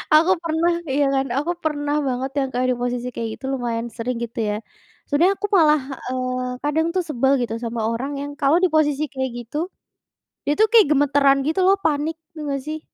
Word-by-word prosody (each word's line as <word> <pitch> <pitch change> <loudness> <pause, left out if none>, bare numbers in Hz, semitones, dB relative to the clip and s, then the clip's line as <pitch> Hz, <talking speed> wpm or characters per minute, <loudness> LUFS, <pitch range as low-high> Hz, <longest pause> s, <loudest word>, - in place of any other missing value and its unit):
aku 330 +4 +5
pernah 335 +1 +1 0.2
iya, 285 +2 +2
kan, 270 0 +1
aku 295 +5 0
pernah 290 -2 -1
banget 260 +1 -2
yang 270 - 0
kayak 250 +1 +1
di - - -4
posisi 245 0 -2
kayak 230 0 -3
gitu - - -9
lumayan 240 -2 -2
sering 245 +1 -2
gitu 235 +1 -6
ya. 210 - 0 0.5
Sebenarnya 335 +7 +3
aku 415 - -2
malah, 305 -5 +5 0.3
eee, 255 0 -2
kadang 320 +2 +1
tuh 370 - +2
sebal 270 -2 +1
gitu 235 -2 -2
sama 230 -2 -2
orang 230 +5 -2
yang 285 0 -5
kalau 285 +3 +4
di 370 - +5
posisi 305 -1 +2
kayak 265 -1 -2 0.2
gitu, 310 +9 -3 0.8
dia 290 - +3
tuh 435 +4 +4
kayak 455 -7 +7
gemetaran 275 -1 +3
gitu 315 +6 0
loh, 390 - +6
panik 310 +1 0 0.2
tau 310 -3 -7
nggak, 275 -1 -2
sih? 310 +2 -4
280 Hz, 200 wpm, -22 LUFS, 255-310 Hz, 0.8 s, kayak